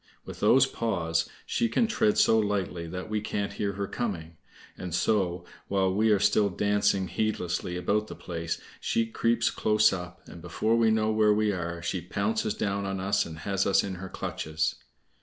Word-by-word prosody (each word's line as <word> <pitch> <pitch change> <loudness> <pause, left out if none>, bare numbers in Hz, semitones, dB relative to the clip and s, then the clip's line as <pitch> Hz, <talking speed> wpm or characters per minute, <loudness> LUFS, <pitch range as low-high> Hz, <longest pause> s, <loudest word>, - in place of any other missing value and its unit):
With - - -9
those 135 +1 +5
paws 85 -11 -1 0.2
she 115 - 0
can 230 - +2
tread 220 -1 +1
so 110 - +5
lightly 95 -5 -1
that 90 +2 -6
we 110 -1 -1
can't 100 -1 -3
hear 100 -1 -2
her 100 +1 -3
coming. 90 -8 -4 0.4
And 90 -2 -5
so, 90 -4 +1 0.2
while 95 -1 +1
we 110 +3 +2
are 105 - +5
still 100 +1 +3
dancing 100 0 +1
heedlessly 90 -3 -2
about 105 +4 0
the - - -8
place, 85 -2 -4 0.2
she 115 - 0
creeps 115 0 +1
close 110 -1 +3
up, 90 -1 -7
and 85 - -11
before 90 +6 0
we 115 -1 +4
know 110 0 +2
where 110 -1 +4
we 105 0 +2
are 85 -2 -4
she 90 +1 -2
pounces 220 - -1
down 100 -1 -1
on 95 -1 -3
us 100 +1 +1
and 80 -1 -8
has 100 -1 0
us 100 - +4
in 100 - -4
her 95 - -6
clutches. 80 -2 -2
100 Hz, 185 wpm, -28 LUFS, 90-110 Hz, 0.4 s, those